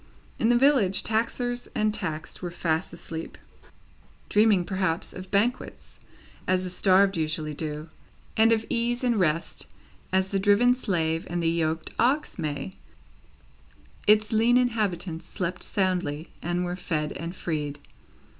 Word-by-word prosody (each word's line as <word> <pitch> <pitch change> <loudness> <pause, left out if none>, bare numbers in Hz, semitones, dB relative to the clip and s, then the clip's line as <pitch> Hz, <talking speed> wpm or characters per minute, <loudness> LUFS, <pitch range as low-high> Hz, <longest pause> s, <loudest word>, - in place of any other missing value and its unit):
In 225 - +3
the 240 - +5
village, 240 -8 +4
taxers 245 +2 -1
and 215 -2 +1
taxed 155 -5 -4
were 180 - -3
fast 165 -1 -1
asleep. 165 -1 -7 0.9
Dreaming, 210 -4 +4
perhaps, 185 -3 -1
of 185 0 -9
banquets, 225 +6 -1 0.5
as 185 0 +2
the 180 - -4
starved 195 +1 +4
usually 155 -1 -2
do, 150 +1 -5 0.5
and 225 +1 +5
of 225 -1 +2
ease 240 +2 0
and 240 -4 +2
rest, 165 -2 0 0.4
as 190 0 +1
the 195 - +1
driven 205 +5 +5
slave 165 -9 -1
and 175 0 -2
the 165 - +3
yoked 165 -1 -1
ox 265 -2 +1
may, 150 +2 -3 1.3
its 210 0 +5
lean 230 +3 +4
inhabitants 195 -9 -1
slept 180 -2 -3
soundly, 180 -5 -1
and 175 +1 -1
were 175 0 -3
fed 155 -4 -2
and 170 +4 -6
freed. 150 -5 -3
185 Hz, 135 wpm, -26 LUFS, 165-220 Hz, 1.3 s, the